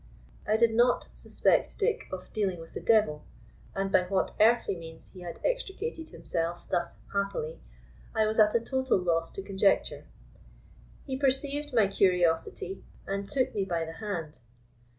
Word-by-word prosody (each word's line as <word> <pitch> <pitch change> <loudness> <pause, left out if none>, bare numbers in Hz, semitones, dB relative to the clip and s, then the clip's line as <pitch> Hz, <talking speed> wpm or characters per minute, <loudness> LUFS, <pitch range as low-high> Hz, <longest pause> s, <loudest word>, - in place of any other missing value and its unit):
I 215 +1 +3
did 230 0 +4
not 240 +2 +3
suspect - - +1
Dick 440 0 0
of 185 -1 -7
dealing 195 -5 0
with 165 - -11
the - - -4
devil, 210 -10 +3 0.5
and 195 0 -1
by - - +5
what 190 +1 0
earthly 230 -2 +4
means 165 -1 -8
he 185 - -12
had 175 -1 -7
extricated 445 -8 -2
himself 170 +1 -3
thus 175 - 0 0.2
happily 200 -6 -2 0.6
I 220 - +3
was 215 +1 0
at 210 0 +5
a - - +5
total 260 +1 +1
loss 165 -2 0
to 195 - -5
conjecture. 195 0 +1 1.0
He 265 - -3
perceived 280 +2 0
my 225 -5 +4
curiosity, 180 -1 +1 0.2
and 195 0 -3
took 260 -1 +1
me 200 - 0
by 170 -3 -1
the 160 - -7
hand. 170 -8 -4
200 Hz, 155 wpm, -29 LUFS, 175-240 Hz, 1.0 s, by